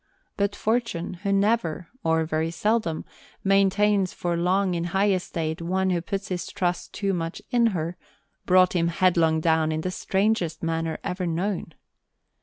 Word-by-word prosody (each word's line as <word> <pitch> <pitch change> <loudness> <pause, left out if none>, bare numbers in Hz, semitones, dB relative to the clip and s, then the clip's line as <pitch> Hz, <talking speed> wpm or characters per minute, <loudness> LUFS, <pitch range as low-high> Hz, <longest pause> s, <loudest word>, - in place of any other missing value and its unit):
But 200 0 0
Fortune, 215 -7 -1
who 200 -1 -1
never, 195 -5 +1 0.2
or 160 0 +2
very 155 +1 -1
seldom, 190 -2 0 0.4
maintains 195 0 +3
for 175 -1 -2
long 185 +2 +1
in 170 -1 -1
high 195 +4 +2
estate 165 -3 -2
one 185 +2 0
who 175 -1 0
puts 195 +3 -4
his 180 -2 -3
trust 175 -1 -2
too 200 -1 -1
much 165 -1 -3
in 240 -2 +4
her, 175 -4 -2 0.5
brought 185 0 +5
him 170 -2 +2
headlong 165 -2 +2
down 160 -1 +2
in 155 0 -1
the 185 - -2
strangest 190 -4 0
manner 165 0 -1
ever 180 0 -2
known. 170 -1 -2
180 Hz, 155 wpm, -25 LUFS, 165-195 Hz, 0.5 s, brought